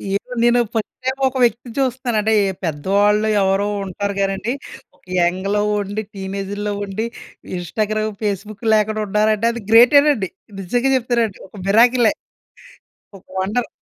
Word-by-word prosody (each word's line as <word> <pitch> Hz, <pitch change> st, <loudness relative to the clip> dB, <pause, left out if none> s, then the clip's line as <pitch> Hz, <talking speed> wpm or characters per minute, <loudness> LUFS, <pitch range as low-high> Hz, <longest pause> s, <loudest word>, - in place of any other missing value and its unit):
ఇప్పుడు 250 Hz, +4 st, -5 dB
నేను 240 Hz, 0 st, +4 dB
first 220 Hz, -2 st, -3 dB
time 260 Hz, +1 st, 0 dB
ఒక 260 Hz, 0 st, -3 dB
వ్యక్తిని 235 Hz, +1 st, 0 dB
చూస్తన్నాను. 255 Hz, -3 st, -1 dB
అంటే 220 Hz, +1 st, +1 dB, 0.3 s
పెద్దవాళ్ళు 200 Hz, +7 st, +2 dB
ఎవరో 195 Hz, +1 st, +1 dB, 0.2 s
ఉంటారు 200 Hz, +2 st, -3 dB
గానీ 195 Hz, 0 st, +1 dB
అండి. 235 Hz, +6 st, -2 dB, 0.4 s
ఒక -, -, -32 dB
యంగ్‌లో 185 Hz, +4 st, +1 dB, 0.2 s
ఉండి, 205 Hz, +1 st, -3 dB
టీనేజుల్లో 200 Hz, +2 st, -4 dB
ఉండి 200 Hz, +3 st, -3 dB, 0.5 s
ఇన్‌స్టాగ్రామ్, 215 Hz, +5 st, -2 dB
ఫేస్‌బుక్ 205 Hz, +1 st, -4 dB
లేకుండా 215 Hz, 0 st, +1 dB
ఉన్నారంటే 215 Hz, +2 st, +2 dB
అది 235 Hz, -, -6 dB
గ్రేటేనండి. 245 Hz, -3 st, +6 dB, 0.3 s
నిజంగా 245 Hz, +8 st, 0 dB
చెప్తున్నా 240 Hz, -1 st, +1 dB
అండి. 190 Hz, -, -17 dB
ఒక -, -, -19 dB
మిరాకిలే. 235 Hz, +3 st, +4 dB, 1.1 s
ఒక -, -, -26 dB
వండర్. 215 Hz, +6 st, -1 dB
215 Hz, 135 wpm, -19 LUFS, 195-235 Hz, 1.1 s, గ్రేటేనండి